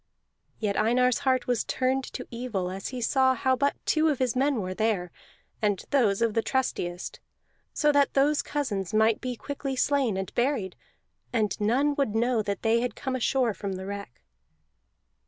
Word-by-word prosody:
Yet 205 -3 -1
Einar's 245 +3 +3
heart 260 -1 +1
was 245 -2 +1
turned 260 +1 0
to - - -6
evil 225 -7 -3
as 195 +1 -5
he 255 -1 -5
saw 260 +2 +3
how 260 +2 +2
but 280 +2 +1
two 315 0 +3
of 290 - 0
his 255 -1 0
men 275 +2 +2
were 185 -2 -3
there, 195 -4 0 0.5
and 205 -3 0
those 230 -6 +3
of 230 -2 +1
the 225 - +2
trustiest; 185 -10 -2 0.5
so 300 - +2
that 285 -1 +2
those 285 +2 +3
cousins 215 - -3
might 220 0 +3
be 250 -1 -3
quickly 275 +1 -4
slain, 260 -6 +1
and 190 -1 -4
buried, 240 -7 0 0.6
and 215 -5 +1
none 265 +8 +2
would 225 -6 0
know 235 0 +2
that 200 -2 -4
they 225 +1 +3
had 240 -2 -2
come 265 -1 -3
ashore 250 -2 +1
from 200 -1 -4
the 190 0 -6
wreck. 200 -11 -7
240 Hz, 175 wpm, -27 LUFS, 205-265 Hz, 0.6 s, Einar's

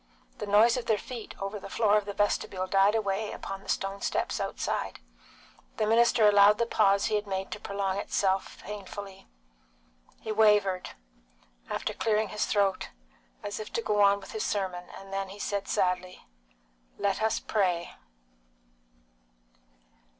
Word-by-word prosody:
The 210 - -4
noise 220 +4 +5
of 240 -2 -4
their 220 -2 +3
feet 235 0 -8
over 195 +2 -4
the - - -9
floor 210 -2 +3
of 210 -1 +2
the 205 - -5
vestibule 195 -2 0
died 195 +2 +3
away 210 -1 -1
upon 195 0 -6
the - - -14
stone 195 0 -2
steps - - -1
outside. - - -3 0.8
The 215 - +1
minister 225 0 +4
allowed 205 0 +6
the 235 - +1
pause 200 -3 +3
he 220 - -1
had 210 0 0
made 190 0 -3
to 215 - -5
prolong 200 -1 -2
itself 195 -1 0
painfully. 200 -1 -8 0.9
He 220 - -5
wavered, 210 -4 +3 0.7
after - - -2
clearing 215 -1 0
his 210 - -1
throat, 200 -2 +1 0.5
as 205 - -4
if 215 - -7
to - - 0
go 210 -1 +1
on 200 0 +5
with 195 - -11
his 435 - -3
sermon, 185 -3 -2
and 195 0 -11
then 195 0 -2
he 195 - -10
said 200 -1 -3
sadly, 180 0 -1 0.7
"Let 200 0 0
us 220 0 +1
pray!" 180 -5 -1
205 Hz, 155 wpm, -28 LUFS, 195-215 Hz, 0.9 s, allowed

